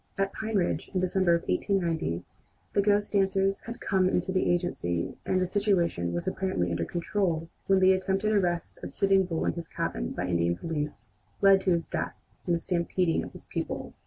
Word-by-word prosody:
At 195 0 0
Pine 220 0 -3
Ridge, 180 -3 0
in - - +3
December 185 -1 +3
of 170 - -4
1890, 160 - 0 0.5
the 200 - +4
ghost 205 +1 +2
dancers 195 0 +2
had 235 - -6
come 185 -1 +2
in - - +2
to 190 - -4
the 185 - +1
agency 130 - -1
and 185 - +2
the 185 - +2
situation 180 - +1
was 85 0 -3
apparently 185 - -1
under 85 0 -1
control 170 - -1 0.2
when 195 -1 +5
the 190 0 +6
attempted 195 +3 0
arrest 175 -5 0
of - - -5
Sitting 195 -1 +3
Bull 165 -3 -2
in - - +1
his 170 -1 -6
cabin - - -3
by 90 - -3
Indian 85 -1 +1
police 150 - -4 0.3
led 195 -1 +6
to 190 - +1
his 170 -1 +1
death - - -3 0.3
and 175 - +3
the - - -1
stampeding 170 0 0
of - - -8
his - - -9
people. - - -4
180 Hz, 195 wpm, -28 LUFS, 165-195 Hz, 0.5 s, the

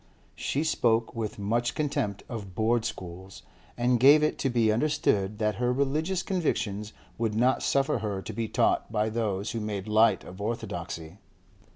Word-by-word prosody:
She 145 - -1
spoke 115 -7 +1
with 110 -2 -3
much 115 +4 0
contempt 105 -9 -1
of 100 -6 -7
Board 115 +2 +1
schools, 95 +2 -7 0.3
and 120 0 +2
gave 145 +4 +7
it 155 - 0
to 135 - +1
be 115 -3 +3
understood 110 -6 +1
that 105 -1 0
her 125 +1 +1
religious 155 +8 0
convictions 110 - -1 0.3
would 110 -2 0
not 125 +4 +3
suffer 135 -3 +1
her 105 -3 -3
to - - -6
be 115 -1 -2
taught - - +1
by 110 0 +1
those 105 -3 -2
who 115 - -3
made 105 -2 -4
light 110 -2 +4
of 95 +3 -10
orthodoxy. 100 -5 -5
110 Hz, 165 wpm, -28 LUFS, 105-125 Hz, 0.3 s, gave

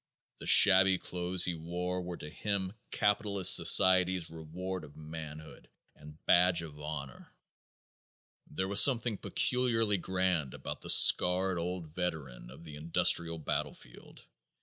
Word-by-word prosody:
The - - -10
shabby 95 -1 +5
clothes 90 0 -1
he 90 - -3
wore 90 +3 -6
were 90 -1 -8
to 75 - -11
him 100 -1 -5 0.2
capitalist 105 -2 +2
society's 95 -2 +3
reward 85 +3 -8
of 75 -2 -15
manhood 80 0 -12 0.3
and 75 0 -16
badge 90 -1 +2
of 75 -2 -12
honor. 75 -3 -9 1.2
There 95 +5 -5
was 100 +1 +4
something 120 -5 0
peculiarly 115 -5 0
grand 90 -7 -3
about - - -8
the - - -9
scarred 90 0 +5
old 85 -2 -7
veteran 80 -9 -7
of 65 +6 -15
the 75 -3 -12
industrial 85 +1 0
battlefield. 80 - -8
90 Hz, 125 wpm, -29 LUFS, 80-95 Hz, 1.2 s, shabby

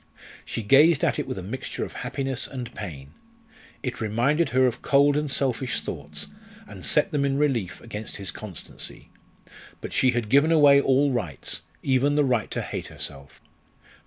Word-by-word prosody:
She 115 - -4
gazed 145 +7 +5
at - - +2
it 145 - -3
with - - -4
a 95 - -5
mixture 120 +8 -4
of - - -10
happiness 135 -2 -3
and 125 -3 -7
pain. 70 -9 -8 0.7
It 125 -4 -4
reminded 130 +9 +1
her 130 +1 +3
of 125 -2 -1
cold 140 +1 +4
and 150 0 0
selfish 130 -2 0
thoughts, 75 -2 -6 0.4
and - - -11
set - - +3
them 145 -2 +1
in 140 -1 +1
relief 130 -11 0
against 110 -2 -6
his 100 -2 -3
constancy. 100 -7 -8 0.7
But - - -7
she 130 - +3
had 120 -3 0
given 140 +8 +4
away 145 -3 +7
all 140 +1 +3
rights 90 - -3 0.2
even 135 +2 +2
the 145 -1 +3
right 125 -5 0
to - - -3
hate - - -5
herself. 70 0 -7
130 Hz, 170 wpm, -25 LUFS, 105-140 Hz, 0.7 s, away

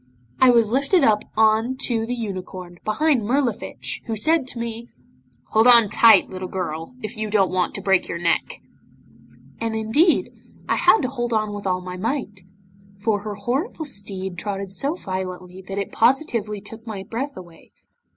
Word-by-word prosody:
I 260 - +7
was 230 -3 +4
lifted 280 +8 +2
up 210 -1 +3
on 220 +3 +3
to 225 -2 0
the 245 - -2
unicorn, 185 -5 -6
behind 270 +4 +2
Mirlifiche, 240 0 -2
who 225 - -2
said 310 +5 +2
to 255 - -4
me 235 0 -5 0.6
'"Hold 220 +2 +4
on 235 -4 +7
tight, 220 -1 +6
little 185 0 -6
girl, 170 +2 -5
if 215 - -5
you 215 0 -3
don't 200 -3 +2
want 185 -1 0
to 195 - -5
break 190 -2 +2
your - - -4
neck." 170 0 -1 1.0
'And, 225 -1 -2
indeed, 230 +11 +2 0.4
I - - +1
had 445 - +5
to - - +1
hold 240 -2 -3
on 215 -1 0
with 205 -1 -5
all 185 0 0
my 180 0 -7
might, 210 -2 -3 0.6
for 205 +1 0
her 210 0 -5
horrible 270 - -3
steed 195 -7 -4
trotted 195 0 -4
so 280 - -1
violently 185 - -6
that 195 - -5
it 200 - -3
positively 230 -5 +1
took 225 +3 -11
my 200 -3 -5
breath 255 +7 -5
away. 175 -3 -13
215 Hz, 170 wpm, -22 LUFS, 190-240 Hz, 1.0 s, I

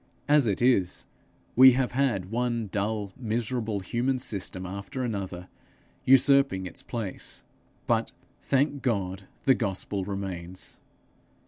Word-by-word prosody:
As 145 -4 +5
it 100 +2 0
is, 100 -8 +2 0.5
we 130 +1 +9
have 130 0 0
had 120 -8 0
one 120 -2 -1
dull 105 -1 -2
miserable 115 -2 -2
human 120 +7 0
system 95 -6 -3
after 100 +9 -5
another 95 -6 -4 0.6
usurping 135 -6 +5
its 90 - -6
place; 110 -6 -5 0.4
but, - - +1 0.3
thank 140 +1 +1
God, 95 -5 -1 0.2
the 135 - +6
gospel 100 -3 -2
remains! 95 -2 -5
110 Hz, 115 wpm, -27 LUFS, 95-130 Hz, 0.6 s, we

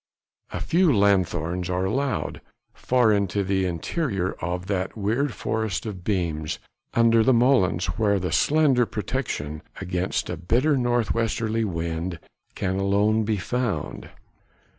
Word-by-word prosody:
A - - -3
few 175 -1 +3
lanthorns 90 - +1
are 90 +1 0
allowed, 135 +7 -1 0.3
far 125 -3 +2
into 100 0 0
the 95 0 0
interior 95 - -2
of 90 +2 -3
that 95 +1 -2
weird 115 +7 0
forest 110 -3 -2
of 95 -5 -6
beams 85 -6 -1 0.4
under 115 -1 +5
the 130 +4 +4
molens 115 -8 +3 0.2
where 100 -3 +3
slender 135 - +3
protection 100 - -3 0.2
against 90 +1 -2
a - - -4
bitter 130 - +2
north 120 -3 +1
westerly 115 0 0
wind 85 -1 -3 0.4
can 95 -1 -1
alone 105 +3 +2
be 110 -1 0
found. 120 +3 -3
100 Hz, 125 wpm, -25 LUFS, 90-120 Hz, 0.4 s, under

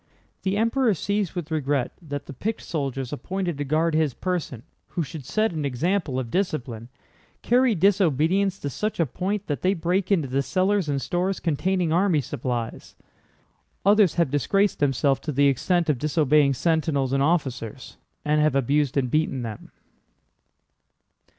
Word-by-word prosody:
The 195 +1 -1
Emperor 230 0 +2
sees 200 +2 -2
with 170 -2 -5
regret 145 -4 0
that 145 -3 -6
the - - -9
picked 220 - -3
soldiers 135 -4 -3
appointed 180 0 -3
to - - 0
guard 155 +3 +1
his 155 -4 +1
person, 170 -10 -3 0.2
who 170 - -2
should 145 -1 -8
set 215 - 0
an 155 -2 -3
example 145 +2 -1
of 125 -3 -3
discipline, 125 - -2 0.5
carry 245 -1 +3
disobedience 190 +1 +2
to 140 - -2
such 215 - -3
a 165 - +4
point 195 - -3
that 145 - -3
they 190 +2 +2
break 180 +3 -1
into 165 -8 +2
the 135 +2 0
cellars 185 +4 +1
and 140 -1 0
stores 180 +2 -1
containing 175 +1 0
army 180 -2 +3
supplies. 120 -2 -4 0.9
Others 200 -4 +5
have 170 -6 +1
disgraced 195 +8 +1
themselves 135 -1 +2
to 155 - -4
the 140 +1 +3
extent 170 +6 +2
of 145 -5 +1
disobeying 150 -2 +3
sentinels 150 -4 0
and 135 - +2
officers, 135 -7 -2 0.3
and 150 0 +2
have 155 -2 +2
abused 140 +1 +1
and 130 -3 0
beaten 150 -5 0
them." 110 -3 -7
155 Hz, 155 wpm, -24 LUFS, 135-185 Hz, 0.9 s, Others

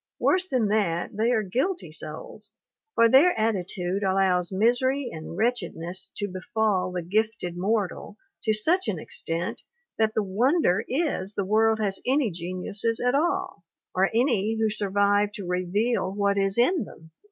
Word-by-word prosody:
Worse 370 0 +1
than 240 -6 +1
that, 195 -4 0
they 225 +3 +1
are 220 -3 +2
guilty 260 - -2
souls; 200 +7 -8 0.4
for 230 - +6
their 270 +4 +5
attitude 190 -3 -1
allows 190 -2 +2
misery 245 +6 +1
and 160 +1 -8
wretchedness 190 -6 -2
to 205 - -1
befall 190 0 -1
the 180 -1 -3
gifted 210 -1 -1
mortal 205 +2 -2 0.3
to 220 - +3
such 315 - +2
an 205 -5 -1
extent 165 +2 -3 0.4
that 220 -1 +2
the 215 - +1
wonder 220 - +2
is 260 - -1
the 200 - -1
world 220 +2 +3
has 200 -3 -1
any 260 -3 +1
geniuses 185 +6 -2
at 245 0 +1
all, 345 - -1 0.3
or 190 +1 +2
any 225 -3 +1
who 220 -1 +2
survive 205 0 +1
to 200 - -5
reveal 185 +4 0
what 200 0 +1
is 195 0 0
in 260 +5 +3
them. 160 -5 -14
210 Hz, 155 wpm, -26 LUFS, 185-235 Hz, 0.4 s, for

